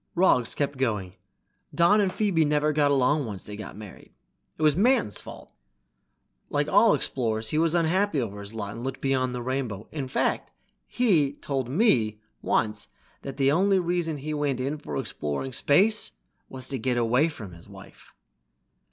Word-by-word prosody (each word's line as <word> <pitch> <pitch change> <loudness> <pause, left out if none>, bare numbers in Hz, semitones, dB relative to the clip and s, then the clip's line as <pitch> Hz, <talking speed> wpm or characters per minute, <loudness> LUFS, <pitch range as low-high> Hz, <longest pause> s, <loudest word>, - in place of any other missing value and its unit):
Roggs 125 -10 +3
kept 140 -2 -2
going. 105 -8 -1 0.6
"Don 200 +5 +5
and 195 -2 +1
Phoebe 195 -7 +1
never 150 0 +1
got 145 -1 +3
along 140 0 +2
once 100 -4 -6
they 105 - -6
were 105 -1 -8
married. 105 -2 -12 0.5
It 155 - -3
was 150 -2 +4
Manton's 210 - +2
fault. - - -11 1.0
Like - - 0
all - - +5
explorers 110 -3 -1
he 155 - 0
was 165 +1 +2
unhappy 170 0 +1
over 105 -5 -4
his 100 +2 -8
lot 100 -2 -4
and 115 +3 -8
looked 135 0 -4
beyond 130 -2 0
the 120 - -4
rainbow. 125 -5 -3
In 140 -4 -4
fact, 130 - -1 0.4
he 170 - +2
told 135 -4 -4
me 125 - +2 0.2
once 105 -1 0 0.3
that 135 -1 -7
the 135 -1 +3
only 195 +5 +3
reason 175 -3 -1
he 150 +2 -5
went 145 -3 -1
in 140 +4 -2
for 75 - -5
exploring 75 - -4
space 195 - +2 0.4
was 130 -1 -6
to 135 -2 -3
get 125 +2 0
away 125 +7 +2
from 105 - -9
his 85 - -15
wife." - - -15
135 Hz, 170 wpm, -26 LUFS, 115-160 Hz, 1.0 s, Don